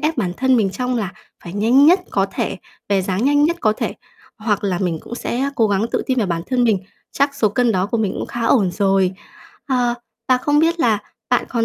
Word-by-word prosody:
ép 310 +2 0
bản 180 -6 0
thân 260 0 +3
mình 205 -4 +2
trong 250 +4 -2
là 200 -5 -3 0.3
phải 170 - -7
nhanh 235 +8 +4
nhất 360 +4 +6
có 195 -1 +1
thể, - - -2 0.3
về 195 -2 +2
dáng 190 +5 -1
nhanh 290 +1 +4
nhất 340 +3 +1
có 215 - +3
thể, - - -3 0.4
hoặc 210 -2 -1
là 185 -3 0
mình 175 -4 -1
cũng - - -8
sẽ, 240 0 -3
á, 275 +1 0
cố 225 -5 +3
gắng 205 +2 +1
tự - - 0
tin 260 -1 0
vào 220 - +1
bản 170 -2 -2
thân 250 -2 +1
mình. 220 -4 +3 0.3
Chắc 280 0 +1
số 220 - +2
cân 235 +3 +1
đó 185 -1 +1
của 230 +3 -2
mình 210 -4 0
cũng - - -4
khá 240 - -6
ổn 205 -9 +3
rồi. 195 -1 +2 0.5
Ờ, 245 -3 +1 0.3
và 255 -1 +4
không 290 +2 +1
biết 330 +2 +2
là 220 -6 +3 0.3
bạn - - +2
còn 230 -2 0
225 Hz, 245 wpm, -19 LUFS, 195-260 Hz, 0.5 s, nhất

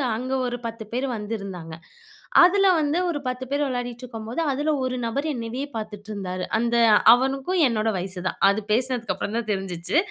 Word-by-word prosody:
அங்க 255 +3 -4
ஒரு 245 0 -3
10 225 -1 -7
பேர் 255 +3 -1
வந்திருந்தாங்க. 200 -6 -6 0.7
அதுல 390 +2 +5
வந்து 300 +3 +1
ஒரு 310 -4 -2
10 255 +1 -3
பேர் 285 +1 +1
விளையாடிட்டு 245 -1 -4
இருக்கும்போது, 225 +4 -5
அதுல 290 +3 -1
ஒரு 255 0 -1
நபர் 280 +7 -2
என்னயவே 240 +2 -4
பாத்துட்டு 215 -1 -7
இருந்தாரு. 185 -3 -4
அந்த 235 +1 0 0.4
அவனுக்கும் 270 +8 +1
என்னோட 225 -2 0
வயசு 185 +1 -5
தான். - - -4
அது 200 +2 0
பேசினதுக்கு 245 -2 +1
அப்றம் 205 +4 -3
தான் 225 -2 -3
தெரிஞ்சுச்சு. 190 - -2
235 Hz, 165 wpm, -24 LUFS, 210-260 Hz, 0.7 s, அதுல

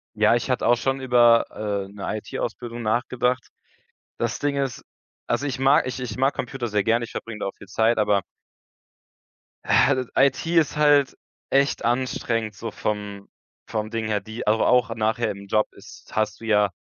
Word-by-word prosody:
Ja, 110 +2 +4
ich 120 +2 -2
hatte 125 -2 +1
auch 120 - +6
schon 135 +3 -1
über, 120 -2 +5
äh, 100 -2 -3
'ne 100 -1 -9
IT-Ausbildung 120 +2 -5
nachgedacht. 125 +2 0 0.7
Das - - -2
Ding 145 -1 0
ist 135 -4 -2 0.4
also, 145 - 0
ich 135 -2 -3
mag 135 +3 +4
ich 125 +1 -4
ich 125 -2 -5
mag 135 +2 +2
Computer 125 -1 -4
sehr 105 -2 0
gerne, 115 +2 +1
ich - - -13
verbringe 115 -2 -6
da - - -1
auch 100 - -6
viel - - -13
Zeit, 110 +4 +2
aber 105 -1 +3 1.4
Ja, 140 - +4
das 130 -2 -2
IT 135 +1 +3
ist 155 -3 +3
halt 145 -2 +4 0.4
echt 140 -2 +2
anstrengend, 115 -3 -1
so 115 +2 -6
vom 105 -2 -4 0.4
vom 110 -1 -3
Ding 115 -1 -3
her, 105 -1 0
die 110 +4 -7
also, 110 +1 +3
auch 125 -2 +3
nachher 110 +1 0
im 100 0 -9
Job 105 +1 +2
ist, - - -15
hast 110 -1 -1
du - - -8
ja 105 -2 +3
115 Hz, 180 wpm, -24 LUFS, 110-130 Hz, 1.4 s, auch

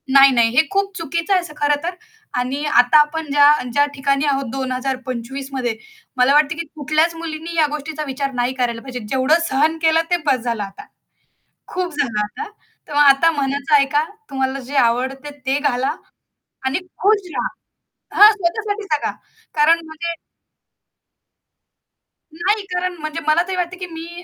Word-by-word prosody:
नाही, 275 0 +7
नाही, 235 -2 +4
हे 275 - +7
खूप 395 0 0
चुकीचं 335 +3 -2
आहे 370 - +3
असं 345 -3 -10
खरंतर. 295 +4 0 0.4
आणि 265 +4 -2
आता 245 0 +5
आपण 310 +2 +1
ज्या 285 0 +6 0.2
ज्या 285 +4 +3
ठिकाणी 275 +1 0
आहोत 275 -1 0
2025 260 0 -4
मध्ये 245 -4 -1 0.4
मला 250 +2 +4
वाटतं, 300 +2 +3
की 335 - -4
कुठल्याच 310 +3 +1
मुलींनी 330 0 -6
या 320 -2 +4
गोष्टीचा 305 +1 -4
विचार 275 +1 -3
नाही 245 +1 0
करायला 240 -3 -1
पाहिजे. 255 -1 -6
जेवढं 265 +7 +2
सहन 305 +4 +2
केलं 325 0 +4
ते 350 - +4
बस 270 -3 +2
झालं 230 -4 -2
आता. 195 0 -10 0.8
खूप 360 -2 -3
झालं 230 -6 0
आता. 410 - -6 0.4
तेव्हा 295 0 +3
आता 275 +5 +5
मनाचं 280 0 -2
ऐका, 285 +1 +3 0.3
तुम्हाला 265 0 -2
जे 265 +2 -8
आवडतं 265 +4 0
ते 270 +2 +1
घाला 260 -2 0 0.7
आणि 265 +6 0 0.2
खुश 405 -2 +3
रहा. - - -1 0.7
हां, 420 +1 +10
स्वतःसाठी 415 +2 -2
जगा 305 -7 -1 0.4
कारण 315 +2 +4
म्हणजे 330 +2 -4 2.2
नाही. 400 +6 0
कारण 360 0 -1
म्हणजे 310 +1 -4
मला 310 +2 +4
तरी 380 - -2
वाटतं 360 0 -3
की 365 - -5
मी 335 +2 -8
290 Hz, 155 wpm, -20 LUFS, 265-330 Hz, 2.2 s, हां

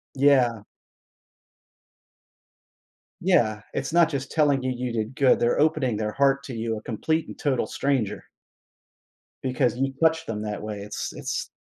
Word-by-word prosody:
Yeah. 130 -5 +3 2.6
Yeah, 115 - +2
it's 135 +4 -3
not 170 -2 +5
just 140 -3 -4
telling 145 -4 +3
you 130 0 -1
you 125 -1 -3
did 110 +2 -3
good, 135 -2 +4
they're 120 +4 +2
opening 150 -7 +2
their 105 0 -2
heart 140 +1 +2
to 125 - -6
you, 115 0 -2
a - - -12
complete 155 +9 -1
and - - -9
total 135 -4 0
stranger 135 -7 -1 1.2
because 125 -1 +1
you 135 +1 0
touch 160 0 +3
them 110 -2 -4
that 105 -1 -4
way, 105 -1 -5
it's 105 - -5
it's - - -3
130 Hz, 150 wpm, -25 LUFS, 115-145 Hz, 2.6 s, not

